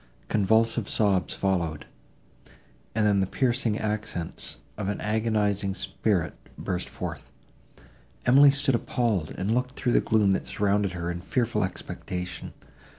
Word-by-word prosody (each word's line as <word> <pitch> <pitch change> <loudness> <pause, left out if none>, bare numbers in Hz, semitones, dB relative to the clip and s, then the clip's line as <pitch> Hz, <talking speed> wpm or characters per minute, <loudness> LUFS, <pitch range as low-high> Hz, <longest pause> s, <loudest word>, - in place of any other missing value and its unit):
Convulsive 110 +1 +2
sobs 100 -4 +2
followed, 85 -6 -1 1.1
and 110 -1 +2
then 100 -1 +4
the 95 - +1
piercing 120 -2 +1
accents 105 -6 -2 0.2
of 100 -2 -4
an 100 - -2
agonizing 105 -3 0
spirit 90 -10 0 0.2
burst 90 -1 -3
forth. - - -6 1.0
Emily 140 +3 +8
stood 140 -1 +2
appalled, 115 - 0
and 100 +4 0
looked 125 +2 -1
through 125 - 0
the - - +4
gloom, 105 -3 +3
that - - -2
surrounded 100 -1 +1
her, 85 -1 -3
in 85 0 -5
fearful 110 +1 0
expectation. 90 -1 -5
105 Hz, 130 wpm, -27 LUFS, 95-115 Hz, 1.1 s, Emily